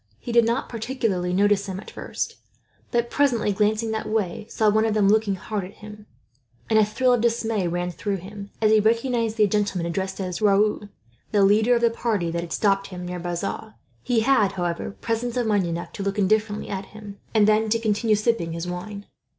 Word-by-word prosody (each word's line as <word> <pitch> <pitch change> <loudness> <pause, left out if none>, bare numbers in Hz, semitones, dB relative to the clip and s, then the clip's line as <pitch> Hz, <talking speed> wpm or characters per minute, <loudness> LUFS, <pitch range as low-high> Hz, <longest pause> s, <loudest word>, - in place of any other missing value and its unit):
He 240 - -7
did 235 -1 +5
not 235 +4 0
particularly 225 -6 -2
notice 200 +1 +2
them 190 -1 -4
at - - -11
first; - - -5 0.5
but 235 -1 0
presently, 245 -7 +2
glancing 215 +2 +1
that 220 - -3
way, 215 0 -2
saw 220 - +1
one 215 +1 +4
of 220 -1 0
them 205 -2 +3
looking 210 -1 +3
hard 205 +2 -4
at 185 +3 -9
him, 210 0 -12 0.6
and 220 - +5
a - - +6
thrill 250 +5 +2
of 245 - +2
dismay 225 -4 0
ran 175 +1 -2
through 200 +2 -3
him, 200 +2 -9
as 215 - +5
he 220 - +6
recognized 230 +1 +1
the 215 - +5
gentleman 205 -4 0
addressed 190 +3 -3
as 185 -1 -4
Raoul, 210 0 +2 0.4
the 205 -2 +3
leader 215 +5 +4
of 235 - 0
the 235 -1 +3
party 210 -7 -1
that 170 0 -2
had 170 - -8
stopped 195 -1 +1
him 180 -2 -7
near 180 0 -5
Bazas. 175 +5 -4 0.3
He 240 -3 +1
had, 220 -5 +3
however, 175 -2 -2
presence 230 +4 -3
of 245 - +1
mind 205 -4 +1
enough 170 0 -5
to - - -6
look 200 +1 -2
indifferently 210 +1 +1
at 195 0 -4
him, 205 -2 -11 0.2
and 210 -1 +5
then 215 +1 +3
to 230 - +3
continue 220 0 +1
sipping 210 -6 0
his 170 +1 -4
wine. 200 +3 -6
210 Hz, 205 wpm, -24 LUFS, 195-225 Hz, 0.6 s, a